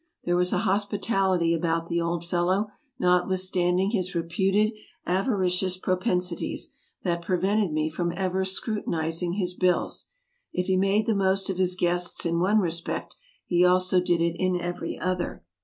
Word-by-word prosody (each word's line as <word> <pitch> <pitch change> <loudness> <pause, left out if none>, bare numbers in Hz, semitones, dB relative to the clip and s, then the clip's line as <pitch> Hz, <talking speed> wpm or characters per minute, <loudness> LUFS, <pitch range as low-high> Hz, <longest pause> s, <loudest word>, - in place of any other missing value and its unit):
There 175 - +1
was 180 0 +3
a - - +2
hospitality 195 -3 +1
about 165 0 0
the 170 0 0
old 170 0 -2
fellow, 185 +4 0 0.3
notwithstand 180 0 +2
ing 195 +2 +1
his 185 -5 -1
reputed 190 +6 +1 0.3
avaricious 185 -2 +1
propensities, 180 -1 -1 0.3
that 170 -2 0
prevented 190 +2 +1
me 155 0 0
from 170 +2 -2
ever 190 0 -1
scrutinizing 175 -4 -1
his 180 -2 -2
bills. 180 -1 0 0.4
If 180 - -1
he 190 - +1
made 195 +3 +2
the 225 - +2
most 195 -1 +1
of 185 - -5
his 185 -1 +2
guests 175 0 0
in 170 0 +1
one 195 +5 +3
respect, 170 -4 -2 0.3
he 175 0 +3
also 185 0 +4
did 175 -1 +1
it 170 0 +1
in 185 -1 +1
every 175 +1 -4
other. 185 - -3
180 Hz, 155 wpm, -26 LUFS, 175-190 Hz, 0.4 s, also